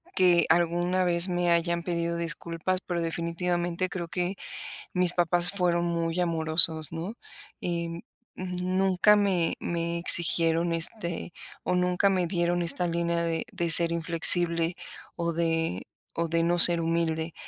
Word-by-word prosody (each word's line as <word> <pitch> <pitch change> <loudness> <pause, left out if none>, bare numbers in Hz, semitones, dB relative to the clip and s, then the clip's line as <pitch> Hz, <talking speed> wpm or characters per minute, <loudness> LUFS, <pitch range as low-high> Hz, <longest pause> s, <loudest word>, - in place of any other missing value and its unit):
que 180 -2 +2
alguna 175 +2 -1
vez 175 0 +1
me 175 -1 -3
hayan 170 0 -1
pedido 170 -1 -4
disculpas, 170 +2 -5
pero 175 -2 -4
definitivamente 175 +2 -4
creo 175 -2 -7
que 180 +3 -4 0.6
mis 180 -1 +3
papás 175 0 +3
fueron 175 -3 -2
muy 170 0 -4
amorosos, 160 -2 +7
¿no? 170 +7 -8 0.5
Eh, 170 -1 -5 0.3
nunca 185 +2 -1
me 190 -5 -1
me 170 0 -5
exigieron 170 0 +1
este 170 0 -3 0.3
o 180 - -3
nunca 180 +2 0
me 185 -2 -2
dieron 175 0 -2
esta 170 +2 0
línea 170 0 -3
de 165 -1 -4
de 170 -1 -4
ser 170 0 +7
inflexible 170 0 +2 0.4
o 170 -1 -4
de 165 - -3 0.3
o 170 0 -3
de 165 +1 -2
no 175 +1 -1
ser 170 0 +6
humilde. 165 -1 -3
170 Hz, 135 wpm, -25 LUFS, 165-180 Hz, 0.6 s, amorosos